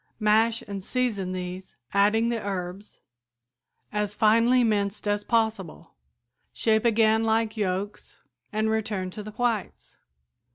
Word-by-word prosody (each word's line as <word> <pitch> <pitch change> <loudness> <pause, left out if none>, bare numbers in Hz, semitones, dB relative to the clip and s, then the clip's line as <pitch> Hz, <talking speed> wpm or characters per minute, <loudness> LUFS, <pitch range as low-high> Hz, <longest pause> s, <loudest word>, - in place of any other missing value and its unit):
Mash 220 +1 +3
and 200 -2 -6
season 215 -6 -1
these, 185 0 -6 0.2
adding 210 +3 +3
the 235 -2 -2
herbs, 195 0 -5 0.9
as 210 -1 -1
finely 230 +4 +4
minced 210 -2 0
as 205 0 0
possible. 220 -6 -1 0.6
Shape 220 0 +1
again 220 -1 +3
like 225 0 +1
yolks 200 0 -3 0.3
and 215 +1 0
return 210 -4 -2
to 210 - -7
the 210 - -8
whites. 220 - -3
215 Hz, 120 wpm, -26 LUFS, 200-225 Hz, 0.9 s, finely